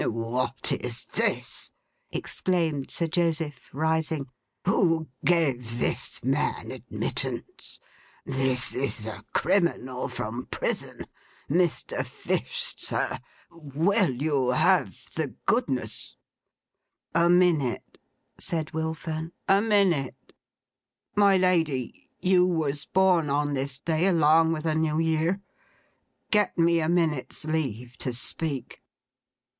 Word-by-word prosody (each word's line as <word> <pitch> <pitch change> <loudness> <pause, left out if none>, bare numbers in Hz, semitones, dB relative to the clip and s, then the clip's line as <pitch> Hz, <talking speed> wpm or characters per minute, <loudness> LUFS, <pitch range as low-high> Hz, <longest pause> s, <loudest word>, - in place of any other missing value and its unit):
'What 120 +4 0
is 120 -2 -1
this!' - - 0 0.4
exclaimed 165 -7 -1
Sir 170 - 0
Joseph, 160 -4 -1
rising. 160 -1 0 0.4
'Who 165 -4 +2
gave 130 -9 +1
this - - -1
man - - 0
admittance? - - -3 0.5
This 130 -2 +1
is 130 -4 -2
a 110 -1 -6
criminal 170 -9 +1
from 115 +4 -4
prison! - - -3 0.4
Mr. 175 +2 0
Fish, - - -1
sir, - - -1 0.3
will 170 - +1
you 135 0 0
have 125 - +2
the - - -3
goodness—' - - -1 1.0
'A 170 +1 +4
minute!' 175 -8 +2 0.4
said 160 -3 -2
Will 160 0 -2
Fern. 160 +1 -5
'A 195 0 +5
minute! 195 - +1 0.8
My 200 -2 +5
Lady, 165 -9 0
you 180 -1 +4
was 150 -5 -1
born 185 -5 +3
on 145 +1 0
this 135 0 -1
day 165 +4 +1
along 165 -2 +4
with 160 0 -3
a 160 - +2
New 155 -1 +1
Year. 165 +4 +1 0.9
Get 210 -3 +2
me 170 0 +4
a 160 0 0
minute's 160 -5 0
leave 125 -6 -3
to 125 - -1
speak. 140 +2 -3
160 Hz, 105 wpm, -26 LUFS, 135-170 Hz, 1.0 s, A